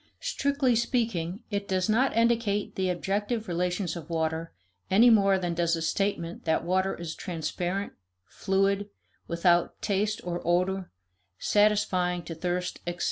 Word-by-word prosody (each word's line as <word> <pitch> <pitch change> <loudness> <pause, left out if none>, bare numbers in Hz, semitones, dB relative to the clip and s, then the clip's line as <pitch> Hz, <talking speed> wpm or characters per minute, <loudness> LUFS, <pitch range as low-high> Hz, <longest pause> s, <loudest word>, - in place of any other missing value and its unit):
Strictly 280 - +1
speaking, 220 -6 -1
it 200 0 -2
does 185 0 0
not 230 +3 +2
indicate 230 -3 +1
the 190 -1 -1
objective 205 +5 -1
relations 180 0 -1
of 170 -2 -8
water 160 0 -1 0.4
any 230 +5 +6
more 195 -3 +5
than 175 -2 -2
does 170 0 +1
a 165 - -4
statement 170 -1 -1
that 160 -1 +1
water 190 +2 +1
is 170 -2 -5
transparent, 180 +4 -3 0.3
fluid, 195 +1 0 0.4
without 170 0 +2
taste 210 +2 0
or 175 0 -3
odor, 185 +2 0 0.5
satisfying 200 - +2
to 165 - -6
thirst, 180 +2 -3
etc. 175 0 -3
190 Hz, 135 wpm, -28 LUFS, 175-205 Hz, 0.5 s, any